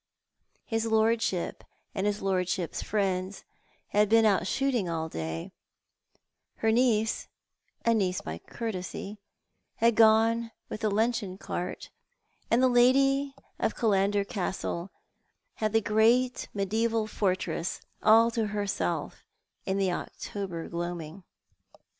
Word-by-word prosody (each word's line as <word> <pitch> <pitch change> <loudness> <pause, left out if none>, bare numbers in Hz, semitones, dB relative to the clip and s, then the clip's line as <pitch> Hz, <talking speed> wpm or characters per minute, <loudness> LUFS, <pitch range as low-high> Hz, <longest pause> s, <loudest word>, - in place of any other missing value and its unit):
His 225 -1 -1
lorclbhip 220 -4 +1 0.4
and 195 0 -1
his 205 -1 -2
lordship's 185 -2 -1
friends 190 -2 -1 0.5
had 210 0 +3
been 225 0 +5
out 195 -3 +3
shooting 250 -6 0
all 160 -1 -2
day; 80 - -5 1.0
her 225 - +1
niece 225 -2 +2 0.3
— - - -43
a 230 - +4
niece 190 -4 +1
by 80 +1 -6
courtesy 205 - -6 0.6
—had 235 +1 +3
gone 225 +1 +4 0.2
with 215 - -6
tlie 215 -2 +1
luncheon 215 -3 0
cart, 180 -1 -5 0.6
and 240 +2 +3
the - - +6
lady 270 +3 +4 0.2
of - - 0
Killauder 200 -2 +2
Castle 190 -4 -3 0.7
had 215 -1 0
the 225 +1 +3
great 230 +4 +2
mediaeval 220 +3 0
fortress 185 -5 -1 0.2
all 225 +2 +6
to 225 -2 -1
herself 205 -1 -2 0.4
in 190 0 0
the 195 -2 +1
October 180 -1 -5
gloaming. 170 0 -5
210 Hz, 115 wpm, -28 LUFS, 185-230 Hz, 1.0 s, the